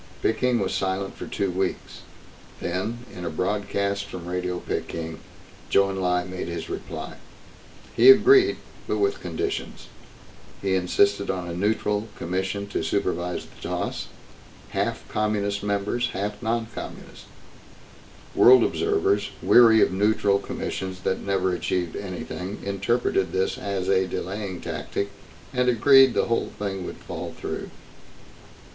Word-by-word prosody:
Peking 125 +2 +2
was 95 -1 -1
silent 95 0 -2
for - - -7
two 100 -2 -1
weeks. 95 +1 -3 0.6
Then, 110 +7 -3
in 90 - -7
a - - -2
broadcast 100 +3 -1
from 90 -3 -8
Radio 90 0 -2
Peking, 80 -2 -4 0.5
Chou 100 0 +4
En - - -4
Lai 90 -1 +1
made 90 -1 -5
his 85 - -5
reply. 385 - -6 0.8
He - - +7
agreed 395 0 +7 0.3
but - - 0
with 400 -1 0
conditions. 400 0 -4 0.7
He 95 -1 0
insisted 100 +2 +2
on 90 -2 -2
a 85 - -4
neutral 105 +3 0
commission 95 +3 -2
to 80 - -2
supervise 90 0 -1
the - - -18
toss, - - -3 0.6
half - - -2
Communist 105 -1 -1
members, 105 +4 0
half 105 +2 -3
non 115 0 0
Communist. - - -9 1.1
World 125 -1 +8
observers, 405 -1 +1
weary 115 -2 +7
of - - +1
neutral 100 0 +2
commissions 95 -2 -5
that 95 - -1
never 95 -2 0
achieved 90 0 -1
anything, 95 0 -5
interpreted 100 -2 0
this 95 0 +1
as 100 -2 -3
a 95 -1 +3
delaying 95 0 -4
tactic 100 - -3 0.4
and 125 -1 +2
agreed 135 +1 +6
the - - +2
whole 115 - 0
thing 95 -3 -3
would - - -7
fall - - -7
through. - - -4
100 Hz, 135 wpm, -25 LUFS, 90-110 Hz, 1.1 s, World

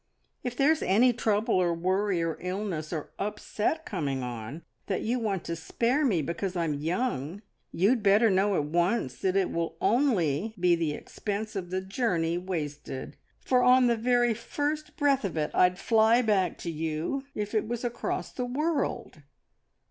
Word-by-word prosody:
If 245 -1 -4
there's 305 +3 +3
any 240 +6 +4
trouble, 220 -2 +1
or 175 -2 +2
worry, 185 +1 0
or 165 -1 -1
illness, 180 -4 -3
or 155 -4 -4
upset 210 +8 -2
coming 140 -9 -2
on, 120 +6 -6 0.2
that 195 - -1
you 245 +3 0
want 200 -6 -2
to 170 - -3
spare 235 - 0
me 190 - +2
because 180 +4 -3
I'm 165 -3 0
young, 170 - -2 0.3
you'd 215 +7 +2
better 210 +2 +5
know 195 +1 +2
at 150 - +1
once 170 - 0
that 185 0 0
it 195 -2 +2
will 165 -1 -2
only 220 - +1
be 175 0 +4
the 165 -3 0
expense 210 +7 -5
of 180 -3 -4
the 185 +1 -2
journey 190 -5 0
wasted, 150 -7 -5 0.3
for 255 -1 +3
on 250 0 +6
the 240 -1 +3
very 240 +1 +2
first 295 +6 -3
breath 280 -3 +2
of 190 -5 -3
it 150 -1 -1
I'd 180 0 +4
fly 225 +3 +4
back 195 -6 +1
to 170 - -2
you 160 - -3
if 210 0 -3
it 215 -1 +1
was 240 +1 -3
across 245 +10 -3
the 250 - -3
world!" 280 - -2
195 Hz, 170 wpm, -28 LUFS, 170-240 Hz, 0.3 s, on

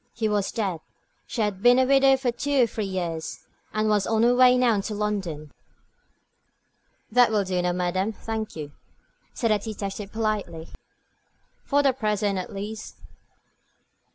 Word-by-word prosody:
He 220 -2 0
was 205 -2 0
dead 195 -8 -2 0.5
she 235 - -3
had 205 -3 -1
been 245 +2 +6
a 260 - +4
widow 270 0 +5
for 260 -2 0
two 270 +2 +1
or - - +5
three 220 -2 -4
years, 170 -4 -4 0.3
and 215 0 0
was 210 -2 +2
on 225 0 +2
her 240 +1 +5
way 250 0 +6
now 235 -5 +3
to 210 +2 -5
London. 190 -8 -3 1.6
"That 245 +1 +5
will 210 -2 +1
do, 185 -1 -1
madame, 180 +3 -1
thank 220 0 -5
you," 150 -2 -6 0.6
said 230 -3 0
the 210 - +3
detective, 200 -1 -6
politely, 210 -7 -3 0.9
"for 285 0 +2
the 270 -2 +4
present 210 -5 -1
at 180 - -6
least." 210 +2 -6
215 Hz, 155 wpm, -25 LUFS, 195-235 Hz, 1.6 s, been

